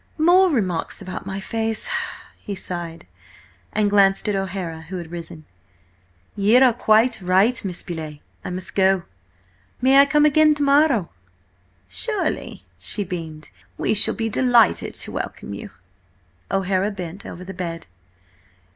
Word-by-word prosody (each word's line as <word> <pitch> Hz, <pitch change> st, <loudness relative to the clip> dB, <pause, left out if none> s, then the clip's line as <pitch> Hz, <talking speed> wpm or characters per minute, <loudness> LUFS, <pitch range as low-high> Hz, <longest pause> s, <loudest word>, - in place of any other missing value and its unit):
"More 355 Hz, +4 st, +5 dB
remarks 190 Hz, -, -1 dB
about 185 Hz, 0 st, -7 dB
my 195 Hz, 0 st, -3 dB
face!" 225 Hz, +2 st, -2 dB, 0.5 s
he 200 Hz, -, -6 dB
sighed, 175 Hz, -3 st, -6 dB, 0.7 s
and 215 Hz, -1 st, +1 dB
glanced 200 Hz, -1 st, +3 dB
at 210 Hz, -, +1 dB
O'Hara, 185 Hz, -4 st, -4 dB
who 190 Hz, -, -4 dB
had 170 Hz, -2 st, -8 dB
risen. 165 Hz, -2 st, -8 dB, 0.9 s
"You 210 Hz, +4 st, +4 dB
are 250 Hz, -3 st, +5 dB
quite 220 Hz, 0 st, +3 dB
right, 190 Hz, +7 st, +2 dB
Miss 180 Hz, -3 st, -5 dB
Beauleigh, 160 Hz, -4 st, -6 dB, 0.3 s
I -, -, -5 dB
must 180 Hz, +1 st, -6 dB
go. 190 Hz, -2 st, +3 dB, 0.8 s
May 265 Hz, +2 st, +5 dB
I 280 Hz, -, +7 dB
come 295 Hz, +2 st, +4 dB
again 305 Hz, +1 st, +5 dB
to 290 Hz, -, -1 dB
morrow?" 280 Hz, -, +3 dB, 0.8 s
"Surely," 95 Hz, 0 st, -1 dB
she 205 Hz, -, -1 dB
beamed. 165 Hz, -5 st, -7 dB, 0.3 s
"We -, -, 0 dB
shall 205 Hz, -, +4 dB
be 225 Hz, -1 st, -2 dB
delighted 235 Hz, -1 st, +3 dB
to -, -, -4 dB
welcome 100 Hz, -, -5 dB
you." 100 Hz, -, -8 dB, 0.8 s
O'Hara 195 Hz, +1 st, 0 dB
bent 185 Hz, -2 st, -7 dB
over 180 Hz, -, -9 dB
the 190 Hz, +1 st, -8 dB
bed. 170 Hz, -3 st, -5 dB
195 Hz, 140 wpm, -22 LUFS, 175-230 Hz, 0.9 s, I